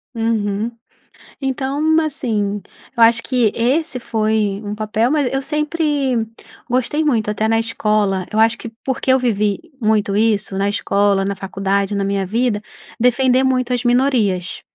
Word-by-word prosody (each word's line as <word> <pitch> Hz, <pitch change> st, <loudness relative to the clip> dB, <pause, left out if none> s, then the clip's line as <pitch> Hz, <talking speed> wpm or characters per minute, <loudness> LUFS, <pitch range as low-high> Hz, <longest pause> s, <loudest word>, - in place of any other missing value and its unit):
Uhum. 225 Hz, -1 st, -1 dB, 0.7 s
Então, 270 Hz, +1 st, -2 dB, 0.2 s
assim, 220 Hz, -10 st, -2 dB, 0.3 s
eu 235 Hz, -, 0 dB
acho 230 Hz, 0 st, +5 dB
que 245 Hz, -5 st, +1 dB
esse 260 Hz, +3 st, 0 dB
foi 215 Hz, -3 st, 0 dB
um 205 Hz, 0 st, -4 dB
papel 215 Hz, +3 st, 0 dB
mas 285 Hz, -4 st, +1 dB
eu 270 Hz, -, 0 dB
sempre 300 Hz, -2 st, 0 dB, 0.5 s
gostei 260 Hz, +5 st, +1 dB
muito. 225 Hz, -8 st, +1 dB
Até 215 Hz, +1 st, -1 dB
na 225 Hz, 0 st, +2 dB
escola, 210 Hz, -4 st, 0 dB
eu 215 Hz, -, 0 dB
acho 225 Hz, +1 st, +4 dB
que 230 Hz, -, -7 dB, 0.2 s
porque 265 Hz, 0 st, 0 dB
eu 260 Hz, -, +5 dB
vivi 210 Hz, -5 st, 0 dB, 0.2 s
muito 215 Hz, -2 st, +1 dB
isso, 210 Hz, -2 st, +1 dB
na 200 Hz, +1 st, +1 dB
escola, 200 Hz, -1 st, +1 dB
na 200 Hz, 0 st, -2 dB
faculdade, 195 Hz, +1 st, -1 dB
na 200 Hz, -, 0 dB
minha 195 Hz, 0 st, -1 dB
vida, 220 Hz, +2 st, 0 dB, 0.4 s
defender 255 Hz, +1 st, +3 dB
muito 255 Hz, -1 st, +1 dB
as 245 Hz, 0 st, -1 dB
minorias. 240 Hz, -8 st, +1 dB
225 Hz, 150 wpm, -19 LUFS, 205-255 Hz, 0.7 s, acho